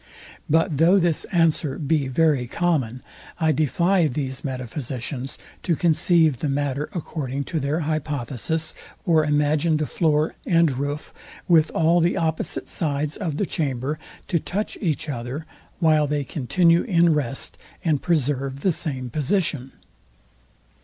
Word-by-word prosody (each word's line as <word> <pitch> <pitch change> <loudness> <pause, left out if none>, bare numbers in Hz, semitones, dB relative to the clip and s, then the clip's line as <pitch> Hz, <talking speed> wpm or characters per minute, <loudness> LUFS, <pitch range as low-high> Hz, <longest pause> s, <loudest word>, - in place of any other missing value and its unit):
But 160 -1 +2
though 170 +6 +5
this 170 -4 +1
answer 160 -5 +1
be 150 -2 0
very 140 -2 +2
common, 130 -6 -1 0.4
I 160 -2 +3
defy 170 +4 +2
these 130 -1 -4
metaphysicians 130 0 -4 0.2
to 170 - +1
conceive 160 -4 +3
the 150 - -1
matter 145 +1 -1
according 140 -5 -3
to 160 - -3
their 145 +4 -1
hypothesis, 155 0 -2 0.3
or 160 -2 +4
imagine 150 +2 +2
the 155 - -1
floor 155 -1 +1
and 165 -3 +3
roof, 145 +3 -4 0.3
with 160 -3 +5
all 165 +2 +4
the 170 +3 +2
opposite 160 -3 -2
sides 150 -1 -2
of 165 -8 -3
the 200 - +1
chamber, 145 -3 -2 0.3
to 170 - +2
touch 205 +7 -3
each 160 -6 -1
other, 130 +3 -4 0.3
while 155 -3 +3
they 145 0 -1
continue 165 +6 +2
in 170 -6 +3
rest, 135 -3 -2 0.3
and 155 -4 +2
preserve 140 -4 0
the 190 - +3
same 130 -6 -3
position. 150 - 0
150 Hz, 135 wpm, -23 LUFS, 140-165 Hz, 0.4 s, though